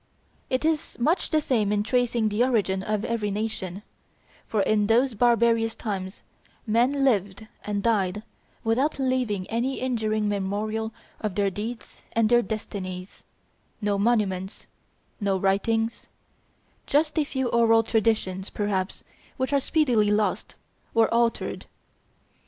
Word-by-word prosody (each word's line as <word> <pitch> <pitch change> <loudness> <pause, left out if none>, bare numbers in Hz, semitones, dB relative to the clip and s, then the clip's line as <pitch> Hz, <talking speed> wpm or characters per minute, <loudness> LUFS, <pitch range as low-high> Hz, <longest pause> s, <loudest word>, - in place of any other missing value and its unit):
It 260 +4 0
is 320 0 -1
much 310 +9 +1
the 310 - +3
same 220 -8 +1
in 205 0 +1
tracing 240 -1 +1
the 210 +3 +2
origin 205 -7 +1
of 210 +2 -2
every 230 -3 -1
nation, 205 -2 -3 0.6
for 215 -3 +1
in 210 +1 +2
those 240 +3 +3
barbarous 230 0 +3
times 195 -3 -5 0.4
men 245 +5 +2
lived 205 -4 +1 0.2
and 205 -1 -2
died 210 -3 +1 0.4
without 255 +8 +1
leaving 255 -8 0
any 245 +4 -1
enduring 220 -4 0
memorial 210 +2 -2 0.3
of 210 -4 -3
their 200 -1 +1
deeds 225 +4 -6
and 225 -1 +3
their 240 0 +5
destinies; 190 -4 -6 0.6
no 205 -2 0
monuments; 200 -4 0 0.5
no 200 -2 +1
writings; 225 +4 0 0.8
just 305 +2 +2
a - - +3
few 265 -3 -2
oral 225 -1 +4
traditions, 215 -4 0
perhaps, 200 -2 -2 0.3
which 260 +1 -1
are 280 - +4
speedily 250 -8 +2
lost 210 0 0 0.4
or 230 0 +4
altered. 235 0 0
220 Hz, 130 wpm, -25 LUFS, 205-240 Hz, 0.8 s, their